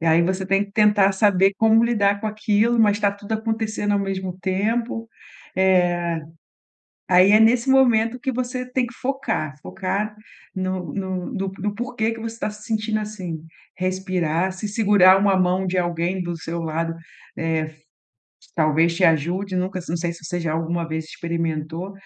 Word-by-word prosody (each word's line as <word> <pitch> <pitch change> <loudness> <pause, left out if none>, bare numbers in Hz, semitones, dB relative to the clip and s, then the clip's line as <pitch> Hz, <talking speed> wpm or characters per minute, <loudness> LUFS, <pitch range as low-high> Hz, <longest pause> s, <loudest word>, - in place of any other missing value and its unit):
E 165 - -2
aí 165 +1 +5
você 190 +2 -1
tem 195 +1 +2
que 200 - -18
tentar 210 -2 +4
saber 195 -1 +3
como 225 +1 +4
lidar 200 -4 +2
com 220 - -3
aquilo, 215 +2 +1
mas 205 -2 +4
está 205 -1 +2
tudo 200 +1 -8
acontecendo 220 -1 -2
ao 200 - +2
mesmo 190 -2 -3
tempo, 225 +4 -1 0.5
eh, 175 -3 +2 0.9
aí 185 +2 +6
é 215 - +7
nesse 230 +3 +4
momento 245 -3 +3
que 265 +1 -2
você 250 +1 -3
tem 255 -1 +1
que 235 - -12
focar, 250 - -2
focar 200 +3 -3 0.4
no 185 -1 -3
no 190 +2 -4
no 195 -2 -3
no 205 +1 -2
porquê 235 -1 -2
que 225 - -6
você 225 0 -5
está 220 - -3
se 210 0 -13
sentindo 215 -1 -1
assim. 185 -7 -6 0.3
Respirar, 185 -2 -1
se 200 +3 -5
segurar 200 -3 +5
uma 195 -1 +3
mão 185 +1 +1
de 185 +1 -1
alguém 175 +1 -1
do 175 -1 -4
seu 165 +1 -5
lado, 165 +1 -2 0.4
eh, 160 -1 -2 0.8
talvez 160 +1 +2
te 190 - -2
ajude. 175 +5 +1
Nunca 185 0 -2
não 170 - -1
sei 170 0 -2
se 165 -1 -14
você 175 - -3
já 165 -2 -2
alguma 165 +1 -2
vez 160 0 -3
experimentou, 165 +2 -4
190 Hz, 170 wpm, -22 LUFS, 175-215 Hz, 0.9 s, é